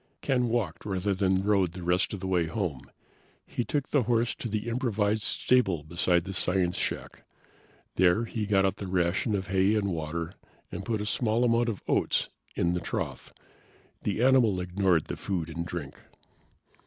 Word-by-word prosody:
Ken 125 -3 +1
walked 115 -4 -1
rather 100 0 -1
than 95 0 +1
rode 100 -4 +2
the 90 0 -7
rest 90 +2 +1
of 100 - -4
the 95 - -3
way 90 -3 +1
home. 80 - -3 0.6
He 120 - -2
took 145 +2 -2
the 145 - +4
horse 120 0 +1
to 120 - -6
the 110 +2 -2
improvised 110 -3 0
stable 100 - +2
beside 85 +2 +1
the 95 - -6
science 90 -1 +1
shack. - - -4 0.7
There 95 +5 +4
he 110 -2 -3
got 95 -2 +3
out 95 0 0
the 100 - -5
ration 90 +4 +1
of 95 -2 -3
hay 95 +2 +3
and 100 -2 +1
water, 85 +1 -3 0.4
and 90 - -5
put 110 0 -1
a - - -3
small 115 +2 +1
amount 120 0 +3
of 105 - -5
oats - - +1 0.3
in 85 0 +1
the 90 - 0
trough. 85 - -4 0.7
The 105 +3 -1
animal 125 -7 +4
ignored 90 -2 +1
the - - -4
food 85 -5 -3
and 85 +1 -4
drink. 80 -7 -5
95 Hz, 180 wpm, -28 LUFS, 90-110 Hz, 0.7 s, the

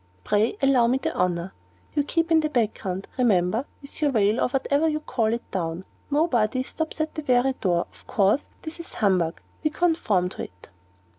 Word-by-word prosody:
Pray 210 +2 +1
allow 260 -4 +5
me 250 +2 +2
the - - -2
honor. 180 0 -1 0.4
You 290 - +2
keep 330 +3 0
in 325 - +6
the 305 -1 0
background, 210 -7 -1
remember, 215 0 +2 0.2
with 280 - -11
your 295 - +3
veil, 215 -2 +2
or - - +3
whatever 280 +4 +1
you 305 0 -1
call 235 -7 0
it, 235 +1 -2
down. 170 0 -3 0.2
Nobody 255 -6 +2
stops 320 +4 -4
at 310 0 -1
the 310 - -4
very 255 -1 +2
door. 175 -3 +1
Of - - -21
course 205 +7 +2
that 325 +1 -7
is 335 - -10
humbug 180 -6 +1 0.2
we 305 - +3
conform 305 - +1
to - - -6
it." 90 0 -17
245 Hz, 190 wpm, -25 LUFS, 190-300 Hz, 0.4 s, in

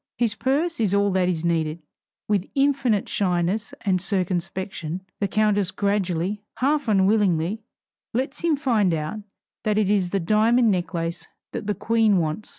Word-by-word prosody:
His 235 -3 +2
purse 290 +7 0
is 205 -3 +2
all 200 0 +2
that 185 -1 +2
is 170 -2 -1
needed. 165 -1 0 0.5
With 200 -3 0
infinite 270 -7 +2
shyness 185 +3 0
and 185 -4 +1
circumspection, 185 -2 -2 0.2
the 200 - +1
countess 205 -2 +2
gradually, 200 -1 -1 0.2
half 285 +1 +1
unwillingly, 195 -2 +2 0.5
lets 265 +4 -2
him 335 -2 +2
find 225 - +2
out 155 +7 -4 0.4
that 210 -1 +1
it 205 -2 +2
is 195 -4 +2
the 195 - 0
diamond 220 +5 +3
necklace 170 -2 -3 0.2
that 205 - -5
the 210 - 0
Queen 220 0 +2
wants. 160 +4 -2
200 Hz, 150 wpm, -24 LUFS, 180-220 Hz, 0.5 s, diamond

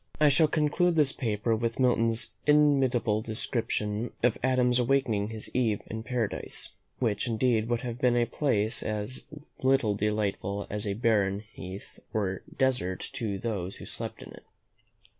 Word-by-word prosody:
I 150 -1 +6
shall 155 +3 +4
conclude 160 +3 +2
this 150 -4 +4
paper 115 -2 0
with 115 +2 -2
Milton's 115 -2 +2 0.2
inimitable 135 -7 +4
description 110 0 -2
of 125 -2 +4
Adam's 125 -1 +3
awakening 120 -5 +1
his 110 -1 -6
Eve 115 -5 +1
in 110 +1 -4
Paradise, 115 -2 -2 0.3
which 115 -4 0
indeed 115 -1 +1
would 120 -1 0
have 120 -1 -5
been 125 -1 +3
a 120 - +3
place 110 -4 0
as 110 +3 -4 0.4
little 130 -5 +3
delightful 100 -1 -1
as 105 0 -2
a 100 - -1
barren 105 -3 +2
heath 95 +2 -9 0.2
or 95 -3 -1 0.2
desert 125 -9 0
to 105 -4 -2
those 95 -3 -3
who - - -10
slept - - -4
in - - -11
it. - - -13
115 Hz, 150 wpm, -28 LUFS, 105-130 Hz, 0.4 s, I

